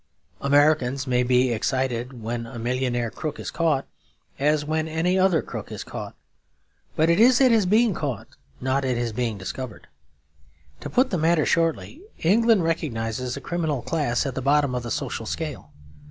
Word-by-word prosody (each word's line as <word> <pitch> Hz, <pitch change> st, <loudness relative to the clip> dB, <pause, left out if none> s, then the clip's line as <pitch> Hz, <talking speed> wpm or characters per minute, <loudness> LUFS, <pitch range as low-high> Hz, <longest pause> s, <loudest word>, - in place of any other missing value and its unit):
Americans 140 Hz, -2 st, +3 dB
may 125 Hz, -2 st, +1 dB
be 125 Hz, 0 st, +3 dB
excited 125 Hz, 0 st, -2 dB
when 115 Hz, +1 st, -3 dB
a 120 Hz, -, -9 dB
millionaire 120 Hz, -1 st, -1 dB
crook 155 Hz, -, -5 dB
is -, -, -5 dB
caught, 160 Hz, -5 st, +1 dB, 0.5 s
as 150 Hz, +1 st, +2 dB
when 155 Hz, +1 st, -1 dB
any 165 Hz, +3 st, 0 dB
other 185 Hz, -4 st, +3 dB
crook -, -, -7 dB
is -, -, -5 dB
caught; -, -, -7 dB, 0.8 s
but 160 Hz, -, +3 dB
it 170 Hz, +3 st, +3 dB
is 245 Hz, +2 st, +6 dB
at 260 Hz, -2 st, +5 dB
his 220 Hz, -5 st, +3 dB
being 220 Hz, +2 st, +4 dB
caught, 140 Hz, -, -4 dB, 0.3 s
not 130 Hz, +2 st, 0 dB
at 130 Hz, -2 st, 0 dB
his 120 Hz, -2 st, -2 dB
being 115 Hz, -2 st, -2 dB
discovered. 110 Hz, +5 st, -7 dB, 0.9 s
To -, -, -6 dB
put 255 Hz, +1 st, +2 dB
the 180 Hz, -, 0 dB
matter 160 Hz, 0 st, +3 dB
shortly, 165 Hz, -, 0 dB, 0.2 s
England 220 Hz, +2 st, +3 dB
recognises 125 Hz, -6 st, -2 dB
a -, -, -7 dB
criminal 160 Hz, -7 st, -2 dB
class 145 Hz, -8 st, 0 dB
at 135 Hz, -, -2 dB
the 130 Hz, -, -4 dB
bottom 140 Hz, 0 st, +2 dB
of 125 Hz, -, -1 dB
the 120 Hz, -, -6 dB
social -, -, -3 dB
scale. -, -, -5 dB
140 Hz, 170 wpm, -24 LUFS, 125-165 Hz, 0.9 s, is